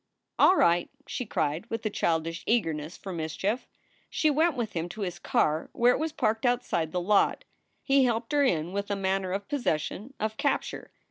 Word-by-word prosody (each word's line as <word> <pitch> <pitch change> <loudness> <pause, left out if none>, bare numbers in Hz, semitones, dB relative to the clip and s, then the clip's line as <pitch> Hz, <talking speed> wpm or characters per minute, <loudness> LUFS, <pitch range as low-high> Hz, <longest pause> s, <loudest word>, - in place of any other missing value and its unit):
"All 375 - +7
right!" 170 - +3 0.2
she 250 - -4
cried, 155 +6 -1
with 225 0 -4
a 215 - 0
childish 165 -2 -1
eagerness 165 -8 0
for 190 - -7
mis 160 -2 -4
chief. 210 +6 -1 0.4
She 310 - +2
went 315 +3 +2
with 235 -3 -3
him 170 0 -3
to 215 +4 -7
his 180 -3 -3
car 155 0 +1
where 245 +1 +4
it - - -2
was 320 +1 -1
parked 225 -7 0
outside 240 -10 0
the 180 - -1
lot. 200 +3 +2 0.4
He 275 -1 +4
helped 230 -1 -1
her 290 -1 +3
in 175 - +1
with 200 0 -3
a 200 - 0
manner 190 -1 -1
of 200 +1 -3
possession, 245 - -2
of 220 0 -2
capture. - - -1
200 Hz, 195 wpm, -28 LUFS, 170-245 Hz, 0.4 s, All